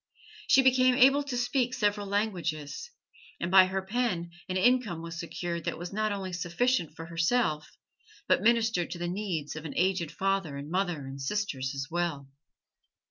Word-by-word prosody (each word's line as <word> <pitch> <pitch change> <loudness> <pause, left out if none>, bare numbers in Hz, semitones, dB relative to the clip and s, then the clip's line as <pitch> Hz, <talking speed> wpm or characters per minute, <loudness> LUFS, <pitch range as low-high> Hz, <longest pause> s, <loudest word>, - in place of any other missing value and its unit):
She 270 - +6
became 255 -1 +5
able 275 +3 +6
to 280 -3 -4
speak 250 0 0
several 205 -1 0
languages, 185 - -2 0.5
and 170 - -2
by 190 -1 +8
her 190 0 -2
pen 190 -5 -1 0.2
an 185 - -1
income 230 -6 +2
was 165 0 -6
secured 170 0 -4
that - - -2
was 175 +3 -7
not 215 +1 0
only 190 -2 -4
sufficient 175 0 0
for 165 - -7
herself, 165 -1 0 0.5
but - - +3
ministered 225 -5 +2
to - - -5
the 175 0 -3
needs 175 -6 -3
of 155 - -6
an 155 - -7
aged 180 -3 +1
father 195 -7 -1
and 145 +2 -7
mother 175 -6 -1
and 135 +1 -8
sisters 135 -5 -2
as 135 0 -3
well. 165 -6 -2
185 Hz, 170 wpm, -29 LUFS, 165-220 Hz, 0.5 s, by